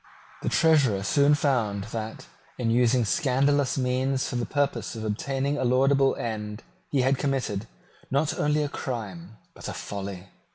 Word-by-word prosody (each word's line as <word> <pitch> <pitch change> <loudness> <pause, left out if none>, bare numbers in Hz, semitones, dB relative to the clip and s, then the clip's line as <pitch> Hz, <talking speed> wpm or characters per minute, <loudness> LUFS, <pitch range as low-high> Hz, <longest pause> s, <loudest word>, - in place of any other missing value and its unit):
The - - -1
Treasurer 140 -12 +3
soon 140 +9 +4
found 115 -9 0
that, 110 -1 -5 0.3
in 115 -2 0
using 120 0 +3
scandalous 140 +1 +2
means 130 +1 0
for - - -4
the 120 -1 -1
purpose 140 -7 -1
of 110 - -5
obtaining 135 +6 -1
a - - 0
laudable 135 +2 +3
end, 105 -1 -4 0.3
he 135 -3 +1
had 130 +1 +2
committed, 130 -8 -1 0.4
not 140 +3 0
only 150 0 +2
a - - -1
crime, 110 -8 -6 0.2
but - - -9
a - - -4
folly. 100 -2 -6
125 Hz, 155 wpm, -26 LUFS, 110-140 Hz, 0.4 s, soon